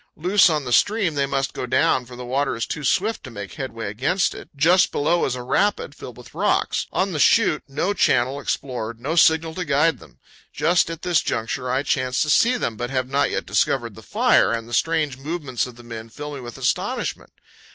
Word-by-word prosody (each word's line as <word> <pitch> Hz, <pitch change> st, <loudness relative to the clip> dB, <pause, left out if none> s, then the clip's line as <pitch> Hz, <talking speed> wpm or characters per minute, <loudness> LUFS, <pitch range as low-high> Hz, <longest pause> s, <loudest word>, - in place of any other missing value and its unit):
Loose 180 Hz, +4 st, +4 dB
on 150 Hz, -3 st, -1 dB
the 125 Hz, -, -2 dB
stream, 205 Hz, -, +2 dB
they 140 Hz, -1 st, 0 dB
must 135 Hz, 0 st, -1 dB
go 125 Hz, -, -4 dB
down, 125 Hz, 0 st, +2 dB
for 125 Hz, -, -11 dB
the 125 Hz, 0 st, -8 dB
water 135 Hz, +3 st, -1 dB
is 115 Hz, -, -2 dB
too 150 Hz, -, -5 dB
swift 210 Hz, -, 0 dB
to 130 Hz, -, -8 dB
make 100 Hz, -5 st, -8 dB
headway 115 Hz, -4 st, -6 dB
against 135 Hz, -, 0 dB
it. -, -, -11 dB
Just 170 Hz, +6 st, +4 dB
below 170 Hz, +4 st, +1 dB
is 130 Hz, -, -1 dB
a 125 Hz, -, -6 dB
rapid, 200 Hz, +11 st, 0 dB
filled -, -, -10 dB
with -, -, -14 dB
rocks. -, -, 0 dB
On 190 Hz, +1 st, 0 dB
the 155 Hz, -, -3 dB
shoot, 195 Hz, -2 st, +4 dB
no 175 Hz, +8 st, -1 dB
channel 130 Hz, -6 st, +2 dB
explored, 120 Hz, -5 st, -4 dB
no 145 Hz, +7 st, -3 dB
signal 160 Hz, -1 st, +4 dB
to 180 Hz, -, -3 dB
guide 150 Hz, +1 st, +2 dB
them! -, -, -17 dB, 0.3 s
Just 170 Hz, 0 st, +2 dB
at 165 Hz, -1 st, -7 dB
this 175 Hz, -3 st, +2 dB
juncture 125 Hz, +3 st, -3 dB
I 130 Hz, +2 st, 0 dB
chance 130 Hz, -2 st, 0 dB
to 150 Hz, -, 0 dB
see 250 Hz, +9 st, +4 dB
them, 115 Hz, -, -3 dB
but 120 Hz, +2 st, -3 dB
have 130 Hz, -1 st, -1 dB
not 140 Hz, +1 st, +1 dB
yet -, -, -3 dB
discovered -, -, 0 dB
the -, -, -12 dB
fire, -, -, +3 dB
and 115 Hz, -1 st, -3 dB
the 120 Hz, -, -10 dB
strange 155 Hz, 0 st, 0 dB
movements 145 Hz, -5 st, -3 dB
of 125 Hz, -, -11 dB
the 120 Hz, -, -14 dB
men 115 Hz, -1 st, -8 dB
fill 145 Hz, +5 st, -7 dB
me 140 Hz, -, -6 dB
with 120 Hz, -1 st, -9 dB
astonishment. -, -, -2 dB
140 Hz, 220 wpm, -22 LUFS, 125-165 Hz, 0.3 s, Loose